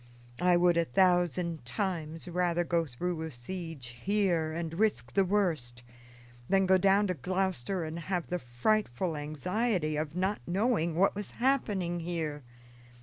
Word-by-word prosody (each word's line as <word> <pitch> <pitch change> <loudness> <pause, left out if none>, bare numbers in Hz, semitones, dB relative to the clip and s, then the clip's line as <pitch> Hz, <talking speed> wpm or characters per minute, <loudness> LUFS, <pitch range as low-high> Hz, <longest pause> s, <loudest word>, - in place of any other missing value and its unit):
I 180 0 +4
would 175 -1 +4
a 170 - +3
thousand 175 0 +2
times 165 - -3
rather 175 0 +1
go 170 -1 0
through 160 +6 -3
a 160 - -3
siege 135 -2 -7
here, 185 -6 +1
and 165 0 -4
risk 125 - +1
the 195 - +4
worst, 165 -12 0 0.7
than 195 0 +4
go 190 0 +5
down 195 +2 +4
to 185 - 0
Gloucester 185 +1 -1
and 160 +1 -5
have 175 +1 -2
the 180 - -2
frightful 155 - 0
anxiety 155 - -1
of 155 +1 -3
not 190 +3 0
knowing 180 -3 +1
what 190 +4 +3
was 205 0 -6
happening 205 -9 +1
here. 165 -3 -3
175 Hz, 145 wpm, -30 LUFS, 155-190 Hz, 0.7 s, go